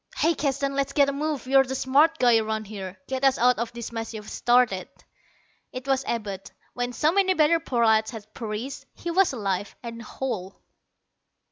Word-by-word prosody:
"Hey, 330 +2 +3
Keston, 275 -2 -1
let's 275 0 -1
get 280 -1 +4
a - - -2
move 295 -1 -2
on. 255 - -7
You're 270 0 +7
the 265 0 -4
smart 285 +5 +3
guy 240 -2 +5
around 220 0 -2
here: 195 -3 -7
get 265 0 -3
us 270 -1 +4
out 245 0 +3
of 235 0 -2
this 235 -1 -7
mess 225 -1 -5
you've 210 -1 -8
started." 240 -7 +2 0.8
It 255 0 -7
was 270 0 +1
Abud. 200 -4 -4 0.2
When 245 0 -2
so 300 +6 +2
many 380 0 +3
better 325 +1 +4
prolats 225 -7 +2
had 215 -2 -10
perished, 225 +4 -5
he 345 - -4
was 380 +2 +3
alive 200 -5 -3
and 230 -1 -7
whole. 215 -6 -5
245 Hz, 190 wpm, -25 LUFS, 220-275 Hz, 0.8 s, You're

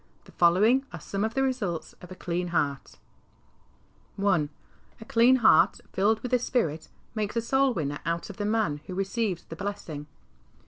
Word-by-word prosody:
The - - -17
following 210 +10 +4
are 170 - -7
some 195 +6 -3
of 220 +1 -2
the 270 - +2
results 205 -12 -2
of 180 - -12
a - - -7
clean 180 0 -3
heart: 145 -5 -2 1.2
I. 190 -7 +2 0.5
A 220 - -10
dean 235 +3 +5
heart 230 -10 +5
filled 215 +3 +2
with 250 - -5
the 250 - +4
Spirit 165 - -1 0.2
makes 215 -1 -2
a 230 - +1
soul 265 +3 +2
winner 145 -3 -2
out 170 +1 -2
of 190 - -14
the 205 - -2
man 210 -9 0
who 185 - -5
receives 195 -1 -1
the 165 - -9
blessing. 165 -7 -5
195 Hz, 175 wpm, -27 LUFS, 170-230 Hz, 1.2 s, dean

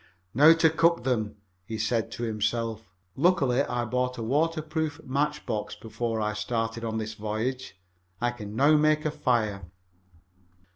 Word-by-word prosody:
"Now 150 +6 +8
to 165 -1 +3
cook 165 -2 +2
them," 115 -5 -1 0.3
he 110 +4 -5
said 115 +1 0
to 120 - -5
himself. 110 -1 -2 0.3
"Lucky 140 -5 +3
I 120 -3 -1
bought 125 +2 -1
a 115 - -4
water 155 +6 +1
proof 155 -1 -3
match 150 +3 -1
box 110 -3 -3
before 115 0 -3
I 105 0 -1
started 115 +1 -2
on 110 -1 -2
this 110 0 -4
voyage. 110 +1 -4 0.4
I 120 0 +1
can 105 -3 -8
now 145 +6 +5
make 155 0 +2
a 155 - +1
fire." 110 - -1
120 Hz, 155 wpm, -27 LUFS, 110-150 Hz, 0.4 s, Now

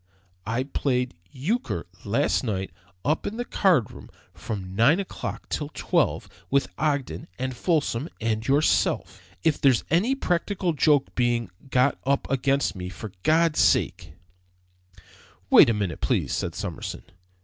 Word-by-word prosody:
I 115 +4 0
played 125 -3 -1 0.2
euchre 200 - -2 0.2
last - - +1
night, 95 -5 -2 0.3
up 150 +2 0
in 220 - -4
the 245 - -2
card 175 - +2
room, - - -12 0.2
from 95 -4 -6
nine 135 - +4
o'clock 195 - -5
till 150 -2 -3
twelve, - - 0 0.2
with 140 +1 +1
Ogden 140 - -1
and 130 0 -3
Folsom 150 -3 0
and 110 0 -1
yourself. 140 +3 +1 0.2
If 160 -2 +1
there's 130 -4 +4
any 210 +11 +3
practical 180 -4 -1
joke 145 -2 +2
being 120 -2 0 0.2
got 130 +2 +2
up 140 +1 0
against 135 0 +1
me, 90 -1 -5
for 105 +2 -8
God's 160 - +3
sake - - +2 0.6
" 90 0 -26
"Wait - - +8
a - - +3
minute, 95 -7 -3
please," - - 0
said 85 -1 -2
Summerson. 95 -1 -5
130 Hz, 140 wpm, -25 LUFS, 110-155 Hz, 0.6 s, Wait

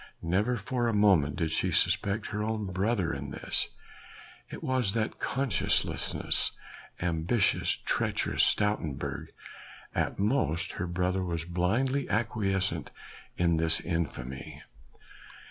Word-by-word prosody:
Never 100 +9 +1
for 120 +3 -1
a 115 - +1
moment 95 -9 +4
did 80 -2 -1
she - - +1
suspect 105 +1 +1
her 105 - -1
own 110 -1 -1
brother 95 -1 0
in 70 0 -5
this. - - -1 0.8
It - - -8
was 130 -6 +1
that 110 -1 -1
conscienceless, 125 -5 +1 0.5
ambitious, 85 +5 +1
treacherous - - 0
Stoutenburg! 105 -9 +1 0.7
at - - -1
most 100 - +1
her 90 - -4
brother 90 +2 0
was 85 -2 -3
blindly 115 +11 0
acquiescent 100 -4 0 0.5
in 85 -2 +3
this 80 0 +3
infamy. 70 -7 -4
95 Hz, 110 wpm, -29 LUFS, 85-110 Hz, 0.8 s, moment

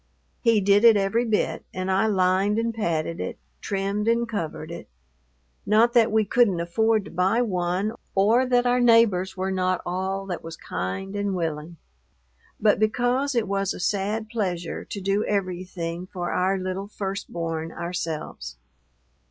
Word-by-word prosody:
He 230 -3 +3
did 200 +2 +4
it 230 -2 +8
every 200 +5 +1
bit, 220 -2 0
and 185 +1 -2
I 195 +4 +3
lined 190 +1 +2
and 230 0 0
padded 165 -6 -2
it, - - -4 0.2
trimmed 200 +1 -2
and 235 +1 +2
covered 170 -7 -4
it. 170 - -8 0.7
Not 225 +3 +4
that 235 -3 +4
we 220 0 +3
couldn't 205 -4 +3
afford 215 +5 +1
to - - -10
buy 190 +7 +2
one 185 0 -1 0.2
or 225 +6 +4
that 245 -1 +3
our 245 0 +3
neighbors 230 -6 +4
were 190 +1 -1
not 185 -1 0
all 190 +2 -2
that 185 -2 -5
was 165 0 -8
kind 95 - -4
and 200 -1 -1
willing; 165 -1 -4 0.8
but 210 -2 +3
because 245 +5 +1
it 230 -3 +1
was 195 0 -1
a - - -8
sad 205 +4 -1
pleasure 185 -7 -3
to 200 - -6
do 200 +2 0
everything 180 -3 -3
for 180 -2 -4
our 190 +2 +1
little 185 +1 -4
first 200 -1 -5
born 165 -1 -3
ourselves. 160 - -5
195 Hz, 160 wpm, -25 LUFS, 180-220 Hz, 0.8 s, it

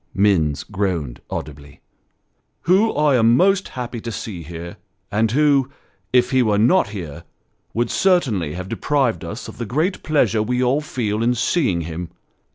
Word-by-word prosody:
Minns 85 -8 +2
groaned 90 - -3
audibly. 70 -1 -7 0.4
" - - -49
Who 195 +6 +4
I 150 -2 +3
am 115 +1 +4
most 195 +1 +3
happy 120 -2 -6
to 115 - -5
see 100 -3 -6
here, 85 +2 -8 0.3
and 110 +2 +2
who, 140 +1 +3 0.4
if 125 +1 +3
he 130 -1 +4
were 105 -4 +2
not 120 - +3
here, 85 -6 -7 0.5
would 120 0 0
certainly 120 - +1
have 90 +1 -6
deprived 135 -3 0
us 100 +8 -6
of - - -11
the 120 - -2
great 160 - -1
pleasure 120 -8 +2
we 125 +3 0
all 130 +4 +2
feel 110 -7 -2
in 120 +2 +2
seeing 120 - +1
him. 85 +1 -6
115 Hz, 165 wpm, -21 LUFS, 90-135 Hz, 0.5 s, Who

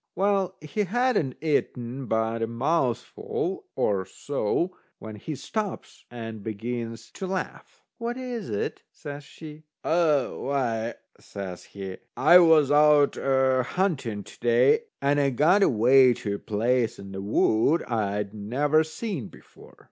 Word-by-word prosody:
Well, 195 -1 +1
he 155 +7 -7
hadn't 235 - 0
eaten 130 -4 -1
but 110 +1 0
a 115 - 0
mouthful 360 - -2
or 100 -2 +1
so 145 - -2 0.2
when 110 -1 -9
he 150 +9 -6
stops 210 - -5
and 115 -3 -7
begins 115 +1 -5
to 190 - -6
laugh. 185 0 -5 0.2
"What 235 +1 -3
is 245 -5 -5
it?" 100 - -3
says 145 0 -8
she. 155 +1 -11 0.2
"A 160 -5 +2
why," 120 -4 -2 0.2
says 95 -3 -8
he, 95 -2 -7 0.2
"I 170 +6 +8
was 160 -5 +5
out 150 -1 +5
a 130 -1 +2
hunting 130 - -1
to - - -15
day, 435 - +3 0.2
and 145 +1 +3
I 140 -1 +3
got 155 - +3
away 125 - +5
to 100 -2 -4
a 100 - -4
place 115 +3 0
in 100 0 -10
the 95 0 -5
wood 110 +9 +2
I'd 105 -3 -2
never 140 +9 +1
seen 160 - -5
before. - - -17
135 Hz, 140 wpm, -26 LUFS, 115-170 Hz, 0.2 s, I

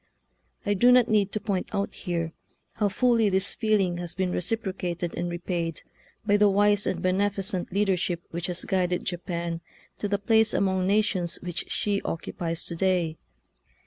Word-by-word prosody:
I 205 - +2
do 240 +5 +5
not 250 -2 +5
need 205 -2 +3
to 215 - 0
point 200 -4 -2
out 200 -1 -1
here 170 -3 -3 0.4
how 210 -2 +1
fully 230 +1 +3
this 190 0 0
feeling 200 -5 +1
has 175 -1 -4
been 185 -1 0
re - - 0
ciprocated 180 -4 -2
and 175 - -2
repaid 175 -2 -3 0.4
by 205 -1 +4
the 205 0 +5
wise 205 +1 +3
and - - -2
beneficent 195 0 0
leadership 190 -3 0
which 170 +1 -2
has 175 -1 -4
guided 180 -2 0
Japan 170 -2 -3 0.4
to 205 - -1
the 200 0 +1
place 220 +2 +3
among 190 -1 +1
nations 195 -4 +1
which 175 -2 -4
she 205 -1 0
occupies 165 0 -3
to 170 - -3
day. 175 -3 +1
190 Hz, 165 wpm, -27 LUFS, 175-205 Hz, 0.4 s, do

